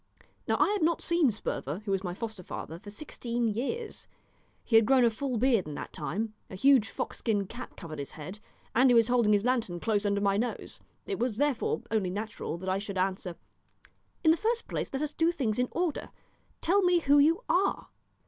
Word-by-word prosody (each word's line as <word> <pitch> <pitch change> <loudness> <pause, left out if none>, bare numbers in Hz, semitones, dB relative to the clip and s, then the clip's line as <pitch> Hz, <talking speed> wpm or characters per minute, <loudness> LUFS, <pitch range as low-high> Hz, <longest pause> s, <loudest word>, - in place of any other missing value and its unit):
Now - - +2
I - - +4
had 415 -1 0
not 330 +1 +1
seen 340 -5 +3
Sperver, 200 - -4
who 200 - -2
was 195 0 0
my 175 -2 -4
foster 220 -2 -5
father, 165 -1 -7
for 205 - -11
sixteen 235 0 -3
years; 280 - -3 0.6
he 225 - 0
had 225 -1 +6
grown 260 -2 +5
a 230 - +4
full 255 +2 -2
beard 230 - +2
in 150 - -6
that - - -7
time, 195 +10 -3 0.2
a - - -8
huge 260 +1 +4
fox - - -4
skin 205 -3 0
cap 240 +6 -9
covered 155 -5 -7
his 140 - -6
head, 180 +7 -8 0.3
and 255 +3 +5
he 245 - +5
was 230 0 +5
holding 240 -4 +3
his 205 +1 +3
lantern 230 -9 0
close 210 +1 0
under 200 -1 +1
my 200 -1 +2
nose. 240 +3 -3 0.3
It 395 - -3
was, 240 -3 -1
therefore, 285 -3 0
only 210 -5 +1
natural 205 -3 -4
that 185 +2 -8
I 190 +1 +1
should 200 -1 -5
answer 185 -1 -1 0.9
"In 315 - +6
the 325 - +3
first 455 +4 -1
place - - -3
let 270 +2 -2
us 300 0 -3
do 330 +1 +2
things 245 -10 -1
in 250 - +2
order. 345 -4 -2 0.5
Tell 395 +4 +3
me 355 -2 +3
who 285 -1 +5
you 325 +10 +4
are." 380 +3 +1
230 Hz, 215 wpm, -29 LUFS, 200-280 Hz, 0.9 s, had